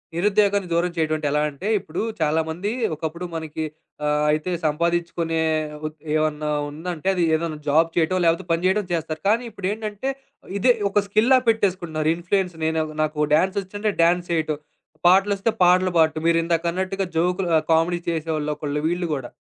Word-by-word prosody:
నిరుద్యోగాన్ని 200 +1 +2
దూరం 175 +1 +1
చేయటమంటే 155 -2 0
ఎలా 150 - +2
అంటే 145 +8 -7
ఇప్పుడు 160 -1 -5 0.2
చాలామంది 160 +6 0 0.2
ఒకప్పుడు 160 +3 -5
మనకి 160 -1 -4 0.4
ఆహ్, 150 0 +1
అయితే 155 +4 -1
సంపాదించుకునే 170 +1 0 0.5
ఉప్ 155 0 -5 0.2
ఏమన్నా 155 -1 0 0.2
ఉందంటే 165 +3 -6
అది 175 - +1
ఏదన్నా 160 -1 -3
జాబ్ 165 +3 +4
చేయటం 175 +2 +2
లేకపోతే 165 +2 +2
పని 165 +2 +1
చేయడం 200 +2 +2
చేస్తారు. 160 -1 -3
కానీ 230 +3 +2
ఇప్పుడేంటంటే 210 +4 -3 0.5
ఇదే 245 +5 +4 0.2
ఒక 205 +1 +2
స్కిల్ 215 +4 +2
లాగా 255 -1 +4
పెట్టేసుకుంటున్నారు. 175 -8 0
ఇన్ఫ్‌ఫ్లూయెన్స్ 180 +1 -1
నేను 160 0 +1 0.2
నాకు 150 -1 0
డాన్స్ 190 +5 +1
ఒచ్చించుంటే 205 +3 -3
డాన్స్ 175 +1 +2
ఎయ్యటం. 155 -2 -1 0.5
పాటలు 195 +3 +5
ఒస్తే 220 +3 +1
పాటలు 185 +1 +4
బాడటం. 155 0 +3
మీరిందాక 165 0 +1
అన్నట్టుగా 190 +1 -2
జోక్‌లు 180 +2 +1
ఆహ్, - - -1
కామెడీ 170 +2 +2
చేసేవాళ్ళు 155 -2 -2
ఒకళ్ళు 150 -1 -3
వీళ్ళు 175 +1 -1
గూడా. 130 -4 -5
170 Hz, 155 wpm, -23 LUFS, 155-190 Hz, 0.5 s, పాటలు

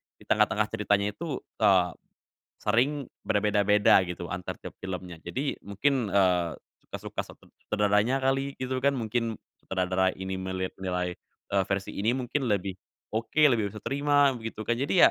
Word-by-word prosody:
di - - -19
tengah-tengah 105 - +3
ceritanya 105 -2 +1
itu, 150 +3 -5 0.2
eee, 95 -5 +4 0.7
sering 130 +6 +1 0.2
berbeda-beda 105 0 +4
gitu 90 -1 -6
antar 90 0 -4
tiap - - -6
filmnya, 90 -2 -6
jadi 130 - -3
mungkin, 125 +5 +1
eee, 90 -4 +3 0.3
suka-suka - - -5
set - - -14 0.3
sutradaranya 105 +5 +2
kali, 135 +1 +1
gitu 130 0 -3
kan, 140 +2 +2
mungkin 115 -1 -1 0.2
sutradara 95 0 0
ini 95 0 -4
melihat 95 0 -3
nilai, 90 -1 -2 0.3
eee, 100 -1 +2
versi 100 0 -2
ini 110 +5 0
mungkin 130 +2 -1
lebih 100 -3 -1 0.3
oke, 115 +8 0
lebih 110 -4 +2
bisa 110 - -8
terima 145 0 +3
begitu 115 -3 -5
kan, 120 +2 0
jadi 145 +7 +5
105 Hz, 145 wpm, -28 LUFS, 95-130 Hz, 0.7 s, jadi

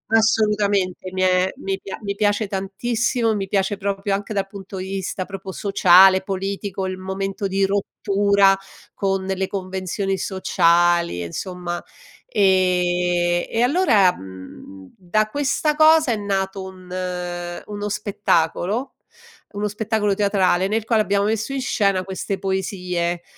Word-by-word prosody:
assolutamente 205 -4 +1
mi 185 - -2
è 185 0 +3
mi 195 0 -3
pia 195 - -7
mi 200 -1 -3
piace 205 0 +1
tantissimo, 225 +4 -1
mi 195 -1 -3
piace 195 +1 0
proprio 200 0 -2
anche 205 +2 -3
dal 195 -1 0
punto 195 -1 -10
di 185 +1 -5
vista 190 -1 -3
proprio 195 -1 -7
sociale, 190 -1 +5
politico, 195 0 -4
il 185 0 -4
momento 195 +1 -3
di 195 +1 +1
rottura 200 0 +2 0.4
con 195 -1 -1
le 190 0 -1
convenzioni 190 0 -3
sociali, 170 - +2
insomma, 175 - -5 0.4
ehm, - - -38 1.2
e 225 - 0
allora, 245 - +4
mhmm, 95 0 -12
da 215 +4 0
questa 290 +3 0
cosa 310 -4 +5
è - - +1
nato 195 -1 -2
un 185 -1 -11 0.8
uno 205 0 -5
spettacolo, 205 +4 -1 0.6
uno 205 +1 -2
spettacolo 210 0 0
teatrale 190 -2 +2
nel 220 +1 -1
quale 225 -2 +3
abbiamo 200 0 +1
messo 220 +5 -1
in 270 - -2
scena 200 -6 +1
queste 190 +1 -4
poesie, 180 -3 -2
195 Hz, 130 wpm, -21 LUFS, 185-205 Hz, 1.2 s, sociale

